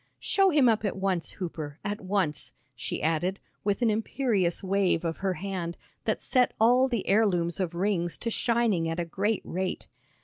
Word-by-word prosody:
"Show 390 Hz, -1 st, +3 dB
him 290 Hz, -6 st, +4 dB
up 225 Hz, -2 st, +3 dB
at 205 Hz, -, -1 dB
once, 190 Hz, -3 st, -1 dB
Hooper; 155 Hz, -6 st, -5 dB
at 205 Hz, +2 st, -3 dB
once," 185 Hz, -6 st, -1 dB, 0.2 s
she -, -, -4 dB
added, 170 Hz, +5 st, 0 dB, 0.2 s
with 205 Hz, +4 st, 0 dB
an 225 Hz, -, +4 dB
imperious 210 Hz, -5 st, 0 dB
wave 190 Hz, -3 st, +1 dB
of 165 Hz, -1 st, -2 dB
her 190 Hz, -1 st, -1 dB
hand 180 Hz, -3 st, -4 dB, 0.3 s
that -, -, -1 dB
set 255 Hz, -2 st, +2 dB
all 245 Hz, +4 st, +5 dB
the 235 Hz, -6 st, -2 dB
heirlooms 185 Hz, -5 st, +2 dB
of 175 Hz, -3 st, -2 dB
rings 175 Hz, -2 st, 0 dB
to 230 Hz, -, -3 dB
shining 225 Hz, -9 st, +1 dB
at 165 Hz, +1 st, -2 dB
a 170 Hz, -, -1 dB
great 200 Hz, +6 st, -1 dB
rate. 185 Hz, +1 st, -3 dB
195 Hz, 175 wpm, -28 LUFS, 175-220 Hz, 0.3 s, all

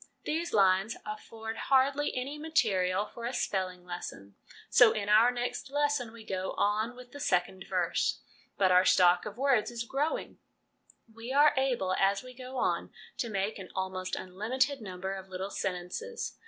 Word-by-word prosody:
These 330 Hz, +3 st, -2 dB
lines 195 Hz, +1 st, +3 dB
afford 220 Hz, +1 st, -6 dB
hardly 275 Hz, +2 st, +3 dB
any 275 Hz, +4 st, -4 dB
material 210 Hz, -, +1 dB
for 230 Hz, +2 st, -9 dB
a 245 Hz, -, -2 dB
spelling 185 Hz, -2 st, -2 dB
lesson, 100 Hz, -, -7 dB, 0.3 s
so 230 Hz, -2 st, +6 dB
in 205 Hz, -2 st, -3 dB
our 220 Hz, +3 st, +7 dB
next 245 Hz, +3 st, -3 dB
lesson 290 Hz, -4 st, 0 dB
we 230 Hz, -1 st, -12 dB
go 190 Hz, -2 st, -3 dB
on 215 Hz, +4 st, 0 dB
with 250 Hz, -1 st, -13 dB
the 285 Hz, -, -9 dB
second 185 Hz, -4 st, 0 dB
verse. -, -, 0 dB, 0.4 s
But 190 Hz, -2 st, +4 dB
our 180 Hz, 0 st, +6 dB
stock 180 Hz, -1 st, +4 dB
of 210 Hz, +1 st, -8 dB
words 265 Hz, -4 st, +2 dB
is 235 Hz, -1 st, -4 dB
growing; 280 Hz, +6 st, -2 dB, 0.7 s
we 230 Hz, +3 st, -7 dB
are 290 Hz, +2 st, +6 dB
able, 250 Hz, -9 st, +1 dB
as 195 Hz, +2 st, +2 dB
we 255 Hz, 0 st, -11 dB
go 255 Hz, +1 st, -8 dB
on, -, -, 0 dB, 0.3 s
to 235 Hz, -, -1 dB
make 200 Hz, +1 st, -2 dB
an 185 Hz, -, -9 dB
almost 185 Hz, -1 st, -2 dB
unlimited 250 Hz, +9 st, -1 dB
number 190 Hz, -1 st, -5 dB
of 190 Hz, -1 st, -8 dB
little 190 Hz, +2 st, -5 dB
sentences. 195 Hz, -, -4 dB
220 Hz, 165 wpm, -30 LUFS, 190-260 Hz, 0.7 s, our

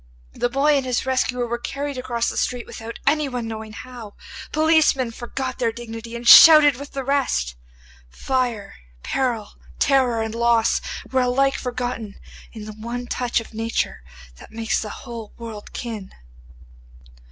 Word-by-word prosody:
The 245 Hz, -, -1 dB
boy 285 Hz, +4 st, +3 dB
and 275 Hz, -, 0 dB
his 255 Hz, -1 st, -1 dB
rescuer 255 Hz, -1 st, 0 dB
were 235 Hz, 0 st, -3 dB
carried 280 Hz, +3 st, -4 dB
across 240 Hz, -2 st, -2 dB
the -, -, -2 dB
street 245 Hz, -1 st, -1 dB
without 225 Hz, +1 st, -8 dB
anyone 275 Hz, -5 st, 0 dB
knowing 220 Hz, -1 st, -7 dB
how. 235 Hz, -3 st, -10 dB, 0.4 s
Policemen 310 Hz, -5 st, +3 dB
forgot 255 Hz, +2 st, -5 dB
their 235 Hz, -2 st, +1 dB
dignity 230 Hz, 0 st, -8 dB
and 235 Hz, 0 st, -5 dB
shouted 305 Hz, -2 st, +10 dB
with 285 Hz, +1 st, -9 dB
the 270 Hz, -, -3 dB
rest. 260 Hz, -, 0 dB, 0.5 s
Fire, 235 Hz, -, -2 dB, 0.3 s
peril, 240 Hz, -6 st, -1 dB, 0.3 s
terror, 255 Hz, -5 st, +2 dB
and 220 Hz, 0 st, -4 dB
loss 235 Hz, -1 st, +2 dB, 0.3 s
were 260 Hz, 0 st, +2 dB
alike 270 Hz, +2 st, +2 dB
forgotten 245 Hz, -4 st, -4 dB, 0.4 s
in 215 Hz, -2 st, -9 dB
the 215 Hz, -, -8 dB
one 235 Hz, +3 st, -5 dB
touch 245 Hz, 0 st, -1 dB
of 230 Hz, -, -11 dB
nature 225 Hz, -, -2 dB, 0.4 s
that -, -, -13 dB
makes 225 Hz, 0 st, -1 dB
the 215 Hz, -, -5 dB, 0.2 s
whole 230 Hz, -4 st, -8 dB
world 225 Hz, -3 st, -9 dB
kin. 220 Hz, -5 st, -6 dB
240 Hz, 150 wpm, -22 LUFS, 225-260 Hz, 0.5 s, shouted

